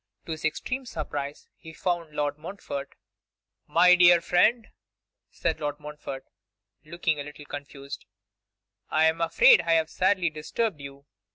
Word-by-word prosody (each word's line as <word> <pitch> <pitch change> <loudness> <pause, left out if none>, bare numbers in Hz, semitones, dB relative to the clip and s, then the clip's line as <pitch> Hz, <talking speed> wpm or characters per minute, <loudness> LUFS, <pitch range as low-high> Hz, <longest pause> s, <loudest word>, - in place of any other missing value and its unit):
To - - -7
his 155 -1 -5
extreme 250 - -3
surprise 145 -8 -5
he 160 - -12
found 170 -3 -3
Lord 145 0 -2
Montfort. 160 -5 -7 0.7
'My 175 +4 +6
dear 175 -1 +7
friend,' 215 +7 +2 0.6
said - - -2
Lord 145 -1 -3
Montfort, 150 -3 -8 0.6
looking 160 -1 -2
a - - -3
little 150 0 -11
confused; 140 -1 -8 0.8
'I 155 +1 +3
am 160 +1 +1
afraid 165 0 +6
I 165 0 +1
have 160 -1 +1
sadly 185 -3 +1
disturbed 155 +3 -3
you. 140 0 -11
160 Hz, 135 wpm, -26 LUFS, 145-175 Hz, 0.8 s, dear